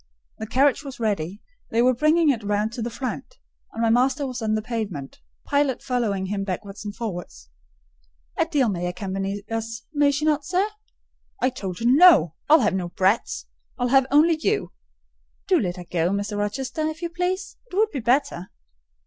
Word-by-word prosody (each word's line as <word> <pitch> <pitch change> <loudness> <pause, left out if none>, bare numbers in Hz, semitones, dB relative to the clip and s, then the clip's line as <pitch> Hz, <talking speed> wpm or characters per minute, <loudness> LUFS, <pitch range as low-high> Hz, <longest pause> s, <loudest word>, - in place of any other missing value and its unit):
The 220 - -5
carriage 270 +5 +2
was 270 -4 -8
ready: 200 -3 -2 0.3
they 230 - 0
were 255 +1 +4
bringing 305 +4 +3
it 230 -5 -3
round 210 +2 0
to 240 - -5
the 235 - -2
front, 265 - -6 0.3
and 230 - -3
my 225 - +3
master 260 +4 +2
was 255 -2 -4
pacing 215 -2 0
the 215 - -2
pavement, 210 - -5 0.2
Pilot 285 -3 +1
following 220 -7 -1
him 195 +1 -2
backwards 195 +1 -5
and 205 -1 -6
forwards. 175 - -6 0.9
"Adèle 290 -9 +2
may 175 0 -2
accompany 195 +2 -4
us, 225 0 -4
may 290 -1 +4
she 285 +2 -1
not, 300 -1 +2
sir?" 365 +5 +1 0.7
"I 255 - +2
told 190 -8 -5
her - - -2
no. 260 - +7 0.2
I'll 310 -1 +7
have 210 - +2
no 180 -2 -2
brats!—I'll 210 +5 -1
have 265 0 +4
only 310 +3 +5
you." 210 - -1 0.8
"Do - - +4
let 180 -1 -2
her 180 - -8
go, 170 -1 0
Mr. 200 +2 -2
Rochester, 245 +8 -3
if 315 +2 -6
you 340 - -1
please: 365 +2 -2
it - - -7
would 430 +2 +3
be 275 - -3
better." 245 -6 0
230 Hz, 180 wpm, -24 LUFS, 200-285 Hz, 0.9 s, no